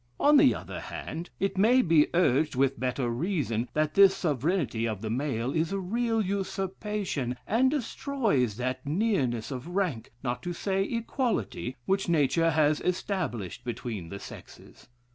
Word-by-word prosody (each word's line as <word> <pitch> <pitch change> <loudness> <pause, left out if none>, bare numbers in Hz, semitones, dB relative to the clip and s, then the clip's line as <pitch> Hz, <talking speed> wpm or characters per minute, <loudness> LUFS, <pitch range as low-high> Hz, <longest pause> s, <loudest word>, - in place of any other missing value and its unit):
On 295 +1 +6
the 280 -2 +6
other - - -7
hand, 165 +3 -6
it 195 -1 -1
may 245 +5 +5
be 160 -3 +4
urged 150 -3 +3
with 135 +1 +1
better 125 0 -1
reason, 125 - -1
that 155 0 +1
this 195 -1 +7
sovereignty 150 -7 0
of 110 -3 -3
the 110 - -2
male 130 -1 -1
is 165 +2 0
a 195 - -1
real 225 +4 0
usurpation, 195 - -3
and 245 +5 +3
destroys 235 - 0
that 130 +1 -2
nearness 145 - 0
of 130 +3 -5
rank, 175 - -1
not 125 -1 -2
to 175 - -4
say 190 +2 -1
equality, 230 - -2
which 195 -1 0
nature 165 +1 +3
has 150 -1 +2
established 150 - -2
between 115 -7 -5
the 100 - -6
sexes. - - -12
160 Hz, 150 wpm, -28 LUFS, 125-195 Hz, -, this